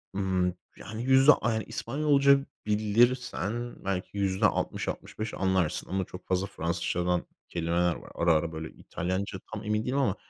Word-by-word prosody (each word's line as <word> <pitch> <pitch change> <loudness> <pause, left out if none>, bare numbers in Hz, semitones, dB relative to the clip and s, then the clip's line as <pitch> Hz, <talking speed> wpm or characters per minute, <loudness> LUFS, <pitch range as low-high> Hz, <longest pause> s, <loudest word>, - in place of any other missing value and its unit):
Imm, 95 -2 +1 0.2
yani, 110 +3 -6
yüzde 135 +3 +7
ay 110 -4 -1
İspanyolca 140 -1 +3 0.2
bilirsen 115 +1 +1
belki 95 +1 -3
%60-65 100 +2 -1
anlarsın 95 -4 0
ama 95 0 -1
çok 90 +1 -11
fazla 95 +1 +1
Fransızcadan 90 0 -1 0.2
kelimeler 85 +1 +1
var. - - -11
Ara 85 -1 +3
ara 80 +1 +1
böyle 80 0 -5
İtalyanca 95 +3 -3
tam 110 0 -5
emin 105 +1 0
değilim 130 +2 0
ama 125 -9 +2
100 Hz, 135 wpm, -28 LUFS, 90-115 Hz, 0.2 s, yüzde